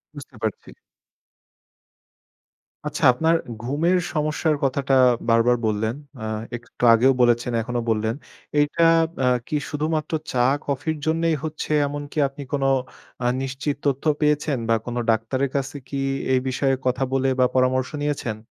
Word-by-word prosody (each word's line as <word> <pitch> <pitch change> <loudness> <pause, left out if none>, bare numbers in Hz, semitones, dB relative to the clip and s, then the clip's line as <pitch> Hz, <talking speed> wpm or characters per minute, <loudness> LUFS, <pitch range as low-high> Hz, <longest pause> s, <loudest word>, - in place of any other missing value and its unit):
বুঝতে 140 -2 -11
পারছি। 110 -3 -3 2.2
আচ্ছা, 150 +2 -4
আপনার 160 +6 +2 0.3
ঘুমের 150 +9 +1 0.2
সমস্যার 155 0 0
কথাটা 135 0 0 0.4
বারবার 115 +1 +4
বললেন। 110 +2 0 0.3
আ - - -5 0.3
একটু 120 +1 -10
আগেও 125 +4 +5
বলেছেন, 120 0 +3
এখনো 120 +1 -3
বললেন। 110 +1 0 0.4
এইটা 145 +3 +2 0.3
বা - - -1 0.2
কি - - -2
শুধুমাত্র 155 +1 -2 0.2
চা-কফির 140 +4 0
জন্যেই 165 0 +1
হচ্ছে 155 -1 -4 0.2
এমনকি 145 +1 -7
আপনি 135 +1 -10
কোন 140 -1 0 0.6
আ - - 0 0.2
নিশ্চিত 135 +2 -3
তথ্য 140 -2 0 0.2
পেয়েছেন 150 -1 +1
বা - - +5
কোন 120 - -4
ডাক্তারের 115 +5 +1
কাছে 140 +1 -2
কি 140 - -5 0.4
এই 130 - +4
বিষয়ে 135 +1 +1
কথা 130 +1 +1
বলে 135 0 +2
বা 130 - +6
পরামর্শ 130 0 +2
নিয়েছেন? 140 -7 -2
135 Hz, 135 wpm, -23 LUFS, 125-150 Hz, 2.2 s, বা